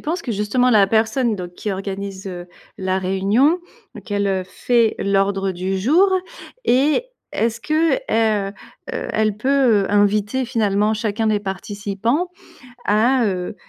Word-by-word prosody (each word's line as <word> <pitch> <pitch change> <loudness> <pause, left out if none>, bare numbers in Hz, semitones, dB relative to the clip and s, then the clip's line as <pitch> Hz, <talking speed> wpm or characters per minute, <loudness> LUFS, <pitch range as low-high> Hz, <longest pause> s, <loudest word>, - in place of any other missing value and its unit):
penses 335 +4 -2
que, 240 - -3
justement, 210 +5 +1
la 205 -4 +5
personne 225 +2 +1
donc 175 -1 -7
qui 210 - -4
organise, 195 0 -5
heu, 175 -2 -6 0.3
la 190 0 -1
réunion, 200 - +2 0.5
qu'elle, 205 -1 -1
heu, 190 -1 0
fait 230 +4 +1
l'ordre 195 -1 +1
du 185 +2 -2
jour, 325 - +4 0.5
et 285 - +3 0.3
est-ce 230 0 -1
que, 315 +2 +2
heu 220 - 0 0.4
heu, - - -4
elle 215 -1 +1
peut, 255 -3 +3
heu, - - -2
inviter, 205 +5 +2
finalement, 215 -3 +1
chacun 220 0 -1
des 215 -1 +2
participants 205 - -2 0.6
à, 235 +4 +3
heu, 185 -1 -2
210 Hz, 140 wpm, -20 LUFS, 195-245 Hz, 0.6 s, la